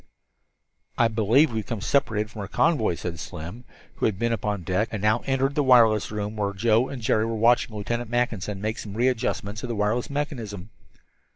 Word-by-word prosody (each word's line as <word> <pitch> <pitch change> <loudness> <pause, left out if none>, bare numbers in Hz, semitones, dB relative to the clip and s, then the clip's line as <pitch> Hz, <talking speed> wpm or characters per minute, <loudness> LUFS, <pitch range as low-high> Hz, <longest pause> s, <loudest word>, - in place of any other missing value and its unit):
"I 115 - +4
believe 115 +6 +3
we've 110 -1 -2
become 115 -1 -4
separated 110 -4 0
from 110 - -7
our 100 - -5
convoy," 120 - +2
said 85 -1 -5
Slim, 90 +10 -8 0.3
who - - +2
had 105 -4 -2
been 115 +2 0
upon 105 -4 -2
deck, 95 +5 0
and 110 - -3
now 105 +3 +2
entered 135 +1 +1
the 145 - +1
wireless 120 -5 +5
room 105 0 -4
where 100 -2 -1
Joe 115 +4 +2
and 130 -4 -7
Jerry 110 0 +2
were 115 - -2
watching 115 0 +3
Lieutenant 120 +3 -3
Mackinson 115 -5 -1
make 110 +1 -2
some 100 -1 -7
readjustments 115 -3 -1
of 125 - -5
the 120 - -2
wireless 105 +6 0
mechanism. 115 - -4
110 Hz, 190 wpm, -25 LUFS, 105-120 Hz, 0.3 s, wireless